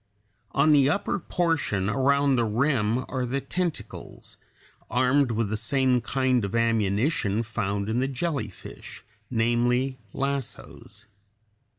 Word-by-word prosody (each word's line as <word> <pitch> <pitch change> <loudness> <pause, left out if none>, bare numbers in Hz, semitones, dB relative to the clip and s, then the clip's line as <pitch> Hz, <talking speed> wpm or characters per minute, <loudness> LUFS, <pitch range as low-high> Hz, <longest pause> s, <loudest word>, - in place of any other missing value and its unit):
] 105 - -44
On 140 +3 +4
the 140 -2 +5
upper 200 +4 0
portion 160 - 0
around 140 +3 +2
the 120 - +2
rim 115 0 +1
are 130 -2 -2
the 125 +3 -1
tentacles, 175 +2 -5 0.5
armed 130 +2 +2
with 115 -2 -1
the 110 - -1
same 125 +2 +1
kind 130 0 +1
of 100 +2 -3
ammunition 115 +1 +1
(Fig. - - -10
30) 110 - -16
found 100 -2 -1
in 110 +2 0
the 130 - +1
jellyfish, 140 +2 -5 0.3
namely, 120 +3 +1
lassos. 140 -2 -5
125 Hz, 130 wpm, -26 LUFS, 115-140 Hz, 0.5 s, the